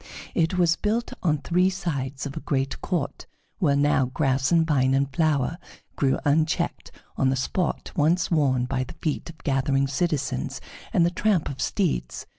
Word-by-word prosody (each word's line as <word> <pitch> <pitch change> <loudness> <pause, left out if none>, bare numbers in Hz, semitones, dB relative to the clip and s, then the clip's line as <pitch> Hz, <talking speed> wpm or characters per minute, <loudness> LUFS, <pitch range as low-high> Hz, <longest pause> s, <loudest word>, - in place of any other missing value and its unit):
It 165 +2 +1
was 170 -2 +3
built 225 +3 -1
on 155 -4 +2
three 180 +5 +2
sides 145 -9 -3
of 140 - -5
a - - -3
great 135 -1 -2
court, 170 -7 -3 0.3
where 145 -6 +3
now 140 -2 +3
grass 130 0 0
and 165 -1 +4
vine 135 -4 +2
and 140 +1 +2
flower 155 0 +1 0.4
grew 135 -2 +2
unchecked, 155 +2 0 0.3
on 135 - +3
the 135 - +1
spot 170 +7 -2
once 170 +5 +2
worn 135 -6 +2
by 130 0 -1
the 125 - -10
feet 155 +1 -3
of 165 - -11
gathering 135 -1 +1
citizens 140 - -1 0.3
and 170 - +4
the 175 - +1
tramp 195 -3 +1
of 135 - -6
steeds. - - -1
145 Hz, 170 wpm, -25 LUFS, 135-170 Hz, 0.4 s, and